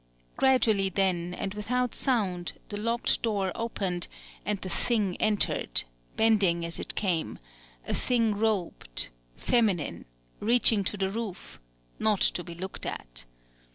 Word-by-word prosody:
Gradually 220 -7 +3
then, 180 -2 0
and 195 - -3
without 245 +4 -1
sound, 195 -9 0 0.2
the 205 - -4
locked 230 +2 +1
door 200 -5 0
opened; 195 -6 -2 0.4
and 205 0 -1
the 190 - -6
Thing 200 0 0
entered, 210 - +2 0.3
bending 195 -7 +3
as 170 - -3
it - - -2
came, 180 -6 -1 0.5
a - - -1
thing 230 -3 +2
robed, 200 - -1 0.3
feminine, 195 - +1 0.3
reaching 225 -2 +5
to 205 - -2
the 190 0 0
roof, 215 -4 -6 0.4
not 215 -3 +2
to 175 - +3
be 170 -1 -8
looked 190 +3 -5
at! - - -6
200 Hz, 130 wpm, -28 LUFS, 180-225 Hz, 0.5 s, reaching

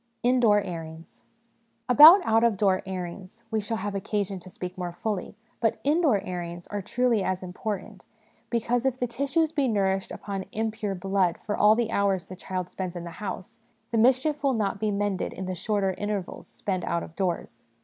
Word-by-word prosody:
" - - -48
Indoor 225 -5 +4
Airings. 165 -3 -8 0.7
About 315 +9 +9
out 225 +1 +3
of 230 -4 +3
door 190 -2 +2
airings 185 +4 -7
we 220 -1 +1
shall 220 +2 -3
have 205 0 -3
occasion 200 0 -2
to 185 - -9
speak 180 0 -6
more 180 -1 -4
fully; 200 +3 -4 0.2
but 225 -2 +1
indoor 295 - +3
airings 175 -1 -6
are 205 0 -4
truly 240 +2 +1
as 185 0 -2
important, 185 +2 -5 0.4
because, 235 +1 0
if 265 -1 0
the 250 - 0
tissues 280 +6 0
be 285 -4 +1
nourished 195 -4 0
upon 195 -2 -5
impure 220 -2 -2
blood 190 -1 +1
for 210 - -1
all 210 +1 +5
the 230 -1 -1
hours 195 -3 +1
the 185 - -9
child 185 -1 -5
spends 185 -2 -5
in 175 - -5
the 170 - -7
house, 210 +3 -6 0.3
the 230 - 0
mischief 260 +6 +3
will 275 -2 +2
not 210 -1 -1
be 215 - 0
mended 200 -2 -1
in 190 - -6
the 185 - -3
shorter 195 +1 0
intervals 205 -3 -4
spent 185 -3 -3
out 170 0 -1
of 165 - -11
doors. 175 - -3
205 Hz, 190 wpm, -26 LUFS, 185-230 Hz, 0.7 s, About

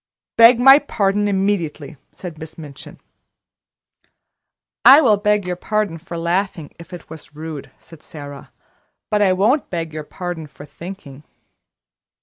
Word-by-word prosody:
"Beg 230 +1 +7
my 270 +3 +8
pardon 205 -7 0
immediately," 190 -8 -2 0.2
said 170 -4 -9
Miss 160 0 -10
Minchin. 145 -4 -11 1.8
"I 275 +3 +9
will 230 -9 +4
beg 210 -1 +1
your 180 0 -3
pardon 205 -2 -2
for 170 +1 -8
laughing, 170 -2 -2
if 170 0 -13
it 175 -2 -10
was 155 -1 -13
rude," 155 -2 -8
said 165 -3 -17
Sara; 145 -3 -11 0.6
"but 210 0 +2
I 195 -2 +4
won't 220 +10 +1
beg 165 -3 -4
your 155 -1 -5
pardon 175 0 -6
for 145 +1 -13
thinking." 150 -2 -11
175 Hz, 135 wpm, -19 LUFS, 155-205 Hz, 1.8 s, I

